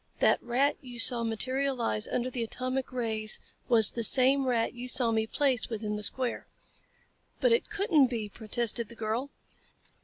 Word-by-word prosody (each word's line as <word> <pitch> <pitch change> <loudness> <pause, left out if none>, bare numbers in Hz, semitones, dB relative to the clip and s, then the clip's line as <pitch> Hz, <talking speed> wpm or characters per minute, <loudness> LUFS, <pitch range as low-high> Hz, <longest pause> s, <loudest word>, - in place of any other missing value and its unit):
"That - - +2
rat 260 +4 0
you 245 -2 -11
saw 235 +1 +6
materialize 240 - -2
under 250 +1 -3
the 245 - -4
atomic 255 +3 -3
rays 220 -3 +1 0.3
was 225 -4 +5
the 230 - -4
same 265 +3 +3
rat 235 -2 0
you 245 +1 -7
saw 240 -1 +1
me 220 0 0
place 265 -2 -1
within 215 -2 -4
the 210 - -5
square." 250 +3 -2 0.9
"But - - +2
it 465 - +1
couldn't 390 -10 +2
be," 230 -4 -4
protested 230 +1 0
the 235 - -11
girl. 225 +5 -3
240 Hz, 160 wpm, -28 LUFS, 225-260 Hz, 0.9 s, saw